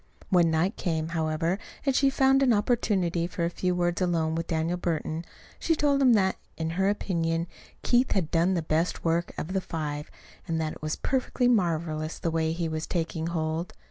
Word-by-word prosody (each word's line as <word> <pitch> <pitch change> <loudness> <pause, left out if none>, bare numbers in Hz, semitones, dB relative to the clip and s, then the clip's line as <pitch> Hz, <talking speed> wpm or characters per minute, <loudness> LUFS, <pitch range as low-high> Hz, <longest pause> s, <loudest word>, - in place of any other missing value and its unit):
When 175 -3 +5
night 165 +5 +1
came, 160 -3 -1
however, 165 +2 0 0.3
and 275 -2 +2
she 275 0 +4
found 270 0 +4
an 255 -3 +5
opportunity 200 -6 +1
for 170 -1 -2
a 170 - -1
few 180 0 -1
words 175 0 0
alone 165 -3 +1
with 165 0 -2
Daniel 165 +1 0
Burton, 165 -1 -2 0.4
she 325 - +2
told 285 -2 +2
him 255 -3 +6
that, 190 -3 +2 0.2
in 160 0 -2
her 190 +3 +1
opinion, 165 -5 0 0.4
Keith 245 +1 +3
had 180 -6 -1
done 175 +3 +3
the 170 - -1
best 160 +3 -1
work 170 +1 +1
of 180 - -4
the 190 - +1
five, 150 -4 -4 0.4
and 165 -1 -1
that 155 -1 -1
it - - -13
was 155 0 -2
perfectly 255 -1 0
marvelous 165 -7 0
the 170 - -2
way 160 0 +1
he 165 0 -2
was 160 0 -3
taking 165 -1 -2
hold. 165 0 -2
170 Hz, 195 wpm, -27 LUFS, 160-190 Hz, 0.4 s, him